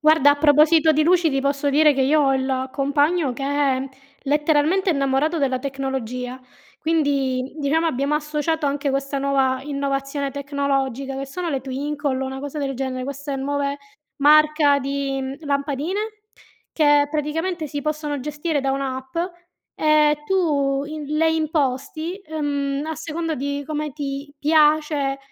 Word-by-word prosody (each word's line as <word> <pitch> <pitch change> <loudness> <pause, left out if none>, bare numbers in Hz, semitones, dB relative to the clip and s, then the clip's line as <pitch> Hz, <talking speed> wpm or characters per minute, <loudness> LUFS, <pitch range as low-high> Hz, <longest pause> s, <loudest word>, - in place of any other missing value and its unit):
Guarda, 305 -2 +5
a 290 - +2
proposito 310 +2 +5
di 310 +1 +2
luci, 345 0 +3
ti 275 -1 0
posso 280 +1 0
dire 300 +1 +5
che 270 -1 +1
io 300 +3 +3
ho 270 -1 +3
il 260 0 -1
compagno 285 +2 +1
che 260 +3 -7
è 275 -2 0 0.3
letteralmente 300 +6 +2
innamorato 280 +2 +1
della 265 -2 +1
tecnologia. 260 -2 -4 0.4
Quindi, 280 -5 0
diciamo 310 +3 +1
abbiamo 280 -1 0
associato 300 +1 -1
anche 280 0 -1
questa 275 +1 -2
nuova 270 -1 +1
innovazione 275 0 -2
tecnologica 275 -2 -2
che 275 0 -4
sono 345 +6 -4
le 270 -3 -1
Twinkly, 280 +2 -3
una 265 0 -5
cosa 285 +2 -6
del 270 -1 -2
genere, 255 0 -3
queste 280 +1 -5
nuove 280 +1 -2 0.4
marca 300 0 +5
di, 275 0 -2
mhmm, 265 0 -4
lampadine 285 +5 -2 0.7
che 290 -2 +4
praticamente 315 +3 -2
si 290 0 -4
possono 300 -2 -2
gestire 300 +2 -2
da 270 0 0
un'app, 265 0 -4 0.6
e 305 -1 +3
tu 285 -7 +1
in 305 0 -6
le 320 +1 +3
imposti, 310 +1 -1
ehm, 285 -3 -2
a 320 - -3
seconda 320 +1 -3
di 285 +1 -3
come 300 -1 -3
ti 280 0 -5
piace 300 -2 +2
285 Hz, 145 wpm, -22 LUFS, 275-305 Hz, 0.7 s, Guarda